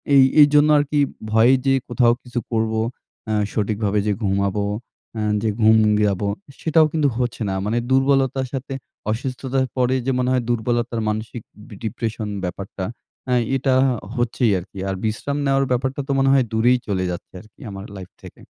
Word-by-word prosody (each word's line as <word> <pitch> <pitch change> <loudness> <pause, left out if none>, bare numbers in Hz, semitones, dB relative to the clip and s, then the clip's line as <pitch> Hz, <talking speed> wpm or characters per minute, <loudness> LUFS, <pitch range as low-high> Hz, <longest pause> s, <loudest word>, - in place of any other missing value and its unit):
এই, 135 - +8 0.2
এইজন্য 145 +1 +6
আরকি 145 0 +1 0.3
ভয়ে 115 +4 +5
যে 135 - +4
কোথাও 120 -1 +3
কিছু 125 -1 -3
করব 110 -1 0 0.5
অ্যা 110 - 0 0.2
সঠিকভাবে 105 -1 0
যে - - +2
ঘুমাবো, 100 0 0 0.5
অ্যা 110 - -2 0.2
যে 110 - +2
ঘুম 110 +1 +6 0.3
যাবো 100 0 0 0.3
সেটাও 160 0 +4
কিন্তু 155 -3 +2
হচ্ছে 125 -2 -2
না। 95 - -1
মানে 110 +3 0
দুর্বলতার 135 -1 +2
সাথে 135 0 -4 0.4
অসুস্থতার 130 +3 -2
পরে 130 0 +2
যে 135 - +1
মনে 125 0 +1
হয় 130 -1 +1
দুর্বলতার 120 0 -1
মানসিক 110 +2 -4 0.3
বি 110 - -11
depression 110 0 -3 0.2
ব্যাপারটা 95 +1 -5 0.4
অ্যা 125 - +2 0.2
এটা 135 0 +1 0.4
হচ্ছেই 120 -1 +1
আরকি। 95 +2 -13
আর 95 - -2
বিশ্রাম 110 +6 -2
নেওয়ার 135 0 +2
ব্যাপারটা 130 +3 0
তো - - -1
মনে 135 0 +3
হয় 135 -2 +4
দূরেই 120 +3 +4
চলে 95 -2 -1
যাচ্ছে 85 - -8
আরকি 110 -1 -22
আমার 95 0 -7
লাইফ 95 -1 -10
থেকে। - - -13
120 Hz, 165 wpm, -21 LUFS, 110-135 Hz, 0.5 s, এই